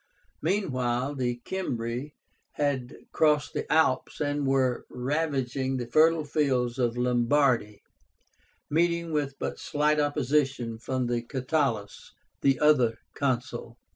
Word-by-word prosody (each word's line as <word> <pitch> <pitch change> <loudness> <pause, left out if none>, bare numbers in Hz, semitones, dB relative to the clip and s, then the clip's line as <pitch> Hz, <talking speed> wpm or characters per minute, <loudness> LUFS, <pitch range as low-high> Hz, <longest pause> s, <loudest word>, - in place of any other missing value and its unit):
Meanwhile, 135 -8 0
the 120 -3 -2
Cimbri 125 -6 -3 0.4
had 140 -4 -1 0.2
crossed 150 -2 +2
the - - -4
Alps 160 -5 +2
and 145 -1 -1
were 130 -2 +1
ravaging 135 -1 -1
the 125 - -3
fertile 155 +5 +4
fields 135 -5 0
of 120 -1 +1
Lombardy, 125 -3 +2 0.8
meeting 170 +1 +1
with 145 -3 -1
but - - -4
slight 150 +1 +1
opposition 135 -5 0
from 130 +1 -2 0.2
Catulus, 130 -6 -2 0.3
the 135 -2 +3
other 130 -7 +4 0.2
Consul. 120 -3 -2
135 Hz, 105 wpm, -27 LUFS, 125-150 Hz, 0.8 s, fertile